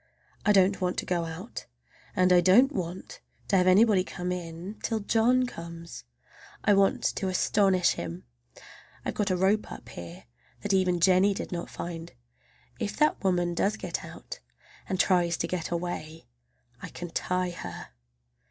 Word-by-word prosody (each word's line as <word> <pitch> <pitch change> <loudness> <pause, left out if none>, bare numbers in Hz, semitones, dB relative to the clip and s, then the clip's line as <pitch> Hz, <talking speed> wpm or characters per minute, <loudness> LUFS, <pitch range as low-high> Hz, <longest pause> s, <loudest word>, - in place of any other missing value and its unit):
I - - +6
don't 195 -1 +4
want 180 0 0
to - - -2
go 175 -2 0
out, 165 +7 -7 0.5
and 185 0 +4
I 175 - +6
don't 225 +11 +6
want 180 - -5 0.3
to 200 - +3
have 180 0 +3
anybody 195 0 +5
come 180 -1 -4
in, 175 +3 -6
till 225 -1 -1
John 240 +5 +3
comes. 170 - -9 0.6
I 205 - +5
want 195 0 +3
to 195 - -2
astonish 185 -1 +3
him. 85 0 -5 0.8
I've - - -2
got 205 -2 -1
a 185 - +2
rope 195 +4 +1
up - - -9
here 85 0 -9 0.4
that 205 -1 0
even 185 -2 +2
Jennie 190 +3 +4
did - - -5
not 170 -1 -4
find. 170 -1 -7 0.7
If 205 - -3
that 300 -6 +2
woman 175 -2 +1
does 200 +5 0
get 180 -4 -4
out, - - -9 0.5
and 185 - -1
tries 175 -3 +3
to 170 - -1
get 170 -2 -3
away, 170 -2 -4 0.6
I - - -7
can 175 -1 -8
tie 180 +1 -1
her! 170 - -8
185 Hz, 160 wpm, -28 LUFS, 170-200 Hz, 0.8 s, I